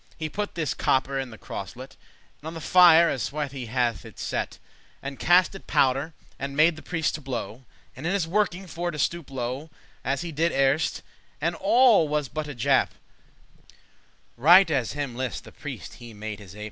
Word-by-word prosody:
He 155 -1 -3
put 205 +6 -4
this 160 -3 -1
copper 135 +1 +1
in 135 -1 -4
the 110 - -11
crosselet, 120 +9 -8 0.5
And 155 - -8
on 160 - -5
the - - -5
fire 170 0 +7
as 130 - -1
swithe* 145 -1 -3
he 130 -4 -6
hath 120 -5 0
it - - -13
set, - - -3
*swiftly - - -18 0.4
And 140 0 -6
cast 180 +2 +4
in 195 - -9
powder, 140 +4 +1 0.2
and 140 0 -5
made 160 +2 +5
the 155 - -11
priest 165 -2 -1
to 155 - -5
blow, 125 -2 -5 0.3
And 135 +6 -5
in - - +1
his 195 -4 0
working 195 0 0
for 175 0 -4
to 155 - -5
stoope 170 +2 -1
low, 130 +3 -4 0.3
As 135 0 -1
he 170 -1 -5
did 165 +3 0
erst,* 135 +3 +1 0.4
and 170 +4 0
all 210 0 +5
was 150 -3 -1
but 155 -1 -4
a 145 - -7
jape; 115 - +2
*before - - -32
trick - - -22 0.6
Right 170 +7 +7
as 130 -6 0
him 145 -4 -4
list 130 -2 -3
the - - -13
priest - - -8
*he 120 -2 -12
made 105 0 -6
his 100 -2 -12
ape. - - -11
145 Hz, 210 wpm, -26 LUFS, 130-170 Hz, 0.6 s, fire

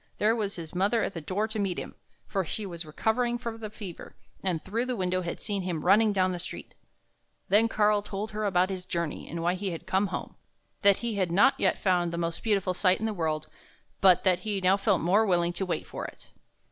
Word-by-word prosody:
there 220 +2 +3
was 205 -3 -2
his 165 -3 -7
mother 200 +5 +2
at - - -2
the 165 - -5
door 190 +8 -1
to 220 0 -4
meet 195 -3 -1
him; - - -6 0.3
for 195 - -1
she 205 +5 -4
was 170 -3 -7
recovering 235 +9 0
from 230 -2 -6
the 215 -1 -5
fever, 205 -5 -9 0.3
and 180 -4 -1
through 225 +5 -1
the 250 - -1
window 185 -2 0
had 170 -1 -4
seen 200 -2 -2
him 175 -4 -3
running 210 +4 +5
down 185 -2 +2
the 180 - -4
street. 175 - -7 0.8
Then 215 +3 +5
Karl 210 -2 +3
told 210 +1 -5
her 215 0 -3
about 185 -2 +2
his 185 -1 -4
journey, 170 -3 -3
and 165 0 -4
why 175 +1 +2
he 190 +1 -3
had 170 -1 -6
come 190 +2 +1
home; - - -6 0.4
that 200 -1 +6
he 225 -3 -2
had 185 -3 0
not 210 +10 +5
yet - - +2
found 180 -3 +1
the 170 - -4
most 170 -1 -2
beautiful 195 -4 +1
sight 185 0 +3
in 220 - -2
the 220 - -1
world, 155 -4 -1 0.5
but 185 -2 +5
that 185 -2 +3
he 205 +1 -2
now 185 +1 +4
felt 200 -1 +1
more 190 +6 +4
willing 175 -4 +2
to 190 +2 -3
wait 175 - -2
for - - -6
it. - - -14
190 Hz, 235 wpm, -28 LUFS, 175-210 Hz, 0.8 s, that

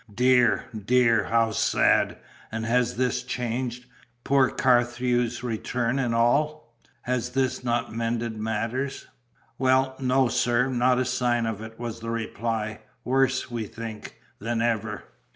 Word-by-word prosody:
"Dear, 125 +2 +3
dear, 115 0 +2
how 115 +1 +2
sad! - - +2 0.3
And 110 0 -3
has 120 +1 +1
this 125 0 0
change 125 0 -3 0.4
poor 135 -1 +3
Carthew's 120 -1 +1
return, 120 +2 -1
and 120 -3 0
all 120 +2 +1 0.3
has 125 -1 -1
this 130 0 -1
not 120 -2 -1
mended 115 0 -2
matters?" 115 +5 -3 0.5
"Well, 130 0 +2
no, 130 0 +2
sir, 120 +2 +1
not 125 0 +2
a 130 - +1
sign 125 -2 +1
of 110 -2 -3
it," 110 0 -10
was 115 -1 -5
the 115 0 -6
reply. 110 -1 -3 0.2
"Worse, 130 0 +1
we 115 -2 -3
think, 110 -1 -8 0.2
than 115 +2 -2
ever." 110 -3 -1
120 Hz, 135 wpm, -26 LUFS, 115-125 Hz, 0.5 s, Dear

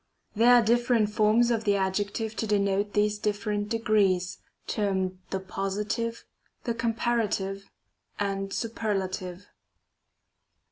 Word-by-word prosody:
2. 215 - -9
There 245 +2 +7
are 240 - +6
different 235 -1 +2
forms 220 +3 +3
of 225 -1 0
the 205 -2 +2
adjective 205 +3 -1
to 220 - -1
denote 200 0 +1
these 210 0 +1
different 205 0 -1
degrees, 205 -5 +1 0.3
termed 190 -3 -1
the 190 - -2
positive, 205 +4 -3 0.4
the 235 - -1
comparative, 225 -4 -1 0.5
and 195 -1 -2
superiative. 195 -5 -3
210 Hz, 110 wpm, -27 LUFS, 195-225 Hz, 0.5 s, There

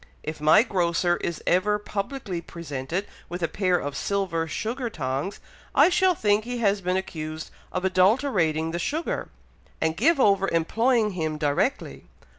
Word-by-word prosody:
If 155 0 -6
my 155 +8 +6
grocer 175 -4 +1
is 170 - -4
ever 205 +4 +2
publicly 205 -2 -4
presented 170 +2 -5 0.2
with 175 0 -5
a - - +3
pair 185 +1 +1
of 145 -4 -4
silver 180 -2 -1
sugar 235 +7 -3
tongs, 140 +2 -3 0.4
I - - +7
shall 375 -1 +3
think 210 -4 +2
he 245 +2 -4
has 205 -3 +1
been 180 0 0
accused 155 -4 -5 0.2
of 185 +1 -2
adulterating 185 - +2
the 170 - -3
sugar, 315 - -2 0.5
and 160 0 0
give 295 - +3
over 195 -4 +4
employing 220 +7 +2
him 160 -4 -2
directly." 150 - -1
185 Hz, 150 wpm, -25 LUFS, 160-215 Hz, 0.5 s, I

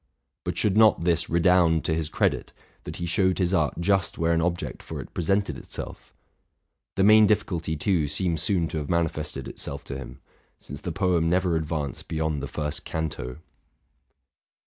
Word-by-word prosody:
But - - -3
should 100 -2 +1
not 110 -5 +5
this 85 -1 +1
redound 85 -1 +3
to 80 - +1
his 80 -1 -1
credit, - - 0 0.3
that - - -6
he 85 - -3
showed 95 +1 +2
his 90 -1 +1
art 80 -5 +1
just 95 +1 +1
where 85 0 +2
an 85 - +2
object 85 0 -2
for - - -7
it - - -9
presented 95 +4 0
itself? - - -8 0.8
The 95 - +2
main 110 +1 +7
difficulty, 90 -7 0
too, 80 -1 +1
seems 80 +1 0
soon 85 -1 +1
to 80 - -2
have 75 - -6
manifested 80 -5 -1
itself 70 +1 -6
to 70 - -6
him, 65 - -9 0.2
— - - -39
since 70 +2 -10
the 90 - -4
poem 85 -1 +1
never 90 -1 +2
advanced 75 -4 -3
beyond 80 -2 -1
the 70 - -4
first 75 +1 -3
canto. 75 -6 -4
85 Hz, 175 wpm, -26 LUFS, 80-90 Hz, 0.8 s, main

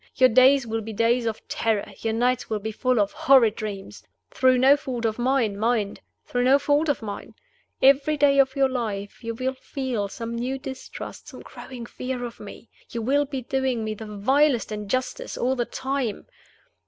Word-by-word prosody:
Your 255 -1 +5
days 260 +2 +5
will 225 0 -2
be 220 +1 -7
days 230 +2 +2
of 220 -1 -5
terror; 220 -3 -1
your 225 -1 -1
nights 250 +2 0
will 220 - 0
be 220 +2 -4
full 250 +2 +1
of 205 -1 +1
horrid 245 -5 +4
dreams 205 -3 -6 0.3
through 255 -1 +3
no 265 +3 +6
fault 255 -5 -4
of 220 +1 -1
mine, 245 -4 +1
mind! 220 -2 0 0.2
through 245 0 -1
no 265 +2 +6
fault 290 +2 +1
of 285 - -1
mine! 205 -2 -7 0.5
Every 280 +3 +5
day 280 -1 +4
of 265 -1 +3
your 275 -1 +3
life 220 -4 -4
you 230 0 -4
will 255 +3 -2
feel 260 -5 -3
some 230 +3 -6
new 250 +3 -2
distrust, 265 0 -8
some - - -10
growing 245 -3 -9
fear 250 +1 -5
of 235 - -9
me, 205 +2 -11 0.2
and - - -17
you 230 - -2
will 285 +5 +2
be 270 -2 -5
doing 260 -2 -1
me 215 0 -2
the 215 +1 -9
vilest 245 +5 +2
injustice 255 - -3
all 255 +2 +1
the 240 -2 -1
time. 265 -5 -3
245 Hz, 190 wpm, -24 LUFS, 220-265 Hz, 0.5 s, no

